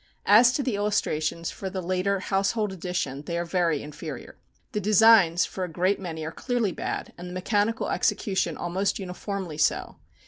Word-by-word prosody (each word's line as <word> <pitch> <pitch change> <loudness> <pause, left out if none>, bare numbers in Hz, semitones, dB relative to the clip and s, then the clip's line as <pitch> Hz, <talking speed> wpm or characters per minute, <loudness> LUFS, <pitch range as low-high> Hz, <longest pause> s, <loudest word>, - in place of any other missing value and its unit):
As 230 +5 +7
to 280 - 0
the 255 - -1
illustrations 170 -5 -1
for 190 - -6
the 190 0 -4
later 185 +2 0
Household 200 +2 0
Edition, 180 -6 -3
they 170 - -2
are 170 - -1
very 170 -4 0
inferior. 150 0 -8 0.4
The 210 - -1
designs 205 -4 +6
for 190 - -5
a 180 - -3
great 185 +5 +1
many 160 -4 -5
are 160 - -4
clearly 240 0 -1
bad, - - -4
and 180 0 -7
the - - -8
mechanical 205 +4 0
execution 205 -2 0
almost 185 +3 -1
uniformly 185 -3 -5
so. - - 0
190 Hz, 170 wpm, -26 LUFS, 175-205 Hz, 0.4 s, As